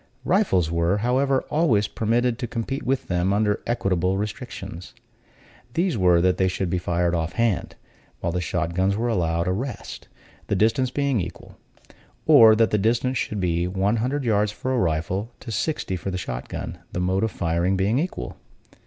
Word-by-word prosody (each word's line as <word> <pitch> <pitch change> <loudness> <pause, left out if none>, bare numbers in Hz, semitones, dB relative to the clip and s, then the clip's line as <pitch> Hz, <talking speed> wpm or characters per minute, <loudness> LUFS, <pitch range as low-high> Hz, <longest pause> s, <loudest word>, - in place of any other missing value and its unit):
Rifles 95 - +2
were, 85 +3 +1
however, 130 +4 +1
always 120 -11 +3
permitted 115 +3 0
to 120 - -3
compete 125 +4 -3
with 135 +1 -1
them, 90 +1 +1
under 105 0 +1
equitable 95 -5 0
restrictions. 95 -4 -6 0.8
These 175 -2 +1
were, 90 -4 +4
that 90 0 +2
they 95 - +2
should 90 -1 -2
be 90 - +1
fired 85 0 0
off 85 0 -1
hand, 115 -1 0 0.4
while 85 - -1
the 90 +1 -1
shot 85 +1 -2
guns 95 +3 +1
were 120 +2 0
allowed 85 -4 0
a - - +2
rest, 120 +7 -5 0.4
the - - 0
distance 125 +4 +2
being 140 -4 0
equal; 85 - -8 0.7
or 110 -1 +8
that 115 0 +3
the 105 - +2
distance 120 +4 +1
should 105 - -2
be 85 -1 0
one 95 +4 0
hundred 130 +5 -1
yards 105 -3 +2
for 130 +5 -3
a 125 - +1
rifle, 90 +5 -1
to 115 - -8
sixty 110 - -2
for 90 - -4
the 95 - -3
shot 60 -8 -5
gun, 85 +2 -6
the - - -3
mode 95 +3 +1
of 110 - +1
firing 85 +1 0
being 105 +7 +2
equal. 180 +4 -4
100 Hz, 180 wpm, -24 LUFS, 90-120 Hz, 0.8 s, or